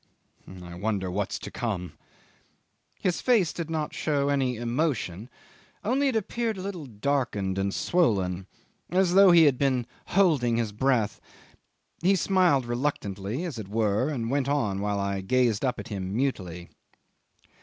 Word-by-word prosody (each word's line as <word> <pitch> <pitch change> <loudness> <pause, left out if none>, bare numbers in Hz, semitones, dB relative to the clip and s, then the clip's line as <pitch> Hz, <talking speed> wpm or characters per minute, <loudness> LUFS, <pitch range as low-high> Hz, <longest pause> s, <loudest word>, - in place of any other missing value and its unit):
I 85 0 -9
wonder 95 0 -2
what's 100 +1 -2
to - - -8
come." 95 -9 -3 1.1
His 180 -3 0
face 215 - +3
did 165 -2 -5
not 155 -2 -2
show 145 -2 0
any 135 -3 +1
emotion, 120 - -2 0.5
only 265 +6 +2
it 260 - 0
appeared 225 +1 -1
a - - -5
little 180 -7 -5
darkened 105 -5 -1
and 100 0 0
swollen, 95 - +1 0.4
as 180 -1 +2
though 195 0 +8
he 170 -2 +7
had 140 -5 +4
been 130 -4 +1 0.2
holding 150 -12 +3
his 115 -3 -1
breath. 115 -1 0 0.8
He 190 +3 +4
smiled 180 -8 +3
reluctantly 120 - -2
as 145 -10 -5
it 105 - -6
were, 110 +4 +1
and 120 -5 -2
went 140 -1 0
on 105 -9 0
while 100 0 -1
I 100 0 -1
gazed 120 +2 +1
up 130 -2 0
at - - -8
him 95 -2 -4
mutely. 90 -10 -2
125 Hz, 150 wpm, -27 LUFS, 100-160 Hz, 1.1 s, though